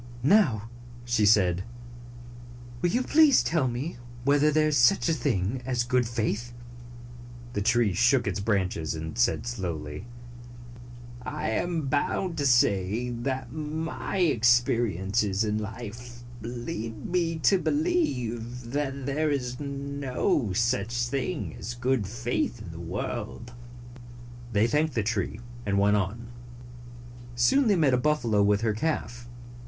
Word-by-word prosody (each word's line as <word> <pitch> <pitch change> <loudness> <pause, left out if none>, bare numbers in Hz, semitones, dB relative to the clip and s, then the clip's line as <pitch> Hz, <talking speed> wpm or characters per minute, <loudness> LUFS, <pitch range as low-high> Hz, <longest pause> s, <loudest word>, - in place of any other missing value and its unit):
"Now," 125 - +3 0.3
sihe 120 -4 +2
said, 95 -4 +4 1.2
"will 175 - +2
you 245 +7 +1
please 295 -1 +5
tell 160 -5 +1
me 125 +7 -4 0.3
whether 145 +2 +4
there 155 0 +3
is 150 - 0
such 125 -2 +4
a 165 - +3
thing 125 - -1
as 125 -1 0
good 125 -1 +1
faith? 115 +1 -2 0.5
" 120 0 -15
The 100 - -1
tree 115 -1 +2
shook 125 +5 +3
its 100 -2 -2
branches 95 -6 -1
and 80 +2 -6
said 120 0 +1
slowly, 85 -6 -5 0.6
" 120 0 -14 0.4
I 150 +5 -3
am 170 -4 -1
bound 155 +6 0
to 140 - +2
say 115 -1 +2
that 130 +3 -3
my 155 -1 -4
experiences 115 - +2
in 105 0 0
life 120 +3 -8 0.2
lead 115 -1 -5
me 170 -2 0
to 185 +5 +3
believe 125 - -1
that 140 -1 -2
there 150 +3 0
is 125 -3 -2
no 140 - -1
such 120 +2 0
thing 120 - -3
as 120 +4 -5
good 125 -4 0
faith 120 +2 -2
in 95 -6 -9
the 85 - -9
world." 110 +6 -5 1.0
They 105 0 +3
thanked 150 +3 +1
the 115 - +1
tree, 105 0 -2 0.2
and 100 -2 0
went 100 +1 +4
on. 105 +4 -2 1.1
Soon 230 - +3
they 205 - +4
met 150 -7 +3
a - - +4
buffalo 125 -7 +1
with 100 0 +3
her 110 -2 +1
calf. 120 -2 -3
120 Hz, 135 wpm, -27 LUFS, 110-140 Hz, 1.2 s, please